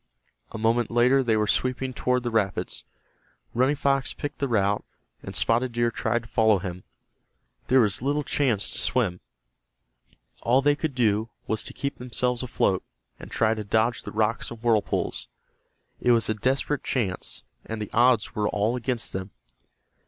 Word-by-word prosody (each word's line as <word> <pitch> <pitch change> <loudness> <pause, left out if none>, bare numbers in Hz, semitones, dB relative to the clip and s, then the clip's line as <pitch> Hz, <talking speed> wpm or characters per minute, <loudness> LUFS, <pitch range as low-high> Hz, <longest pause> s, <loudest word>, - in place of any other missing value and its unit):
A - - -6
moment 115 +1 +1
later 125 +3 +4
they 115 -4 +2
were 105 - +2
sweeping 130 +3 0
toward 125 0 0
the 120 - -2
rapids. 105 -4 -1 0.7
Running 130 +5 +3
Fox 135 -1 +1
picked 145 -1 -5
the 140 - 0
route, 100 -4 +1 0.4
and - - -8
Spotted 120 +2 +1
Deer 120 0 +1
tried 115 +1 -1
to - - -13
follow 110 -2 +3
him. 90 -1 -6 0.8
There 130 0 +5
was 105 -2 +1
little 145 +3 0
chance 125 -8 +2
to - - -5
swim. 95 -9 0 1.2
All 130 +3 +3
they 145 0 +4
could 150 -2 -3
do 110 -2 +2 0.2
was 110 -1 -1
to - - -7
keep 140 0 -4
themselves 125 0 -1
afloat, 100 -6 0 0.4
and - - -10
try 110 0 +2
to 110 -1 -4
dodge 110 +3 +1
the - - -7
rocks 110 +2 0
and 120 - -9
whirlpools. 115 -3 0 0.7
It 125 - +4
was 115 -1 +2
a - - +3
desperate 135 +6 0
chance, 100 -8 -1 0.2
and 110 0 -5
the 105 - -5
odds 120 -1 +3
were 105 -1 0
all 105 +4 0
against 125 -1 -2
them. 95 +1 -4
115 Hz, 165 wpm, -26 LUFS, 110-130 Hz, 1.2 s, There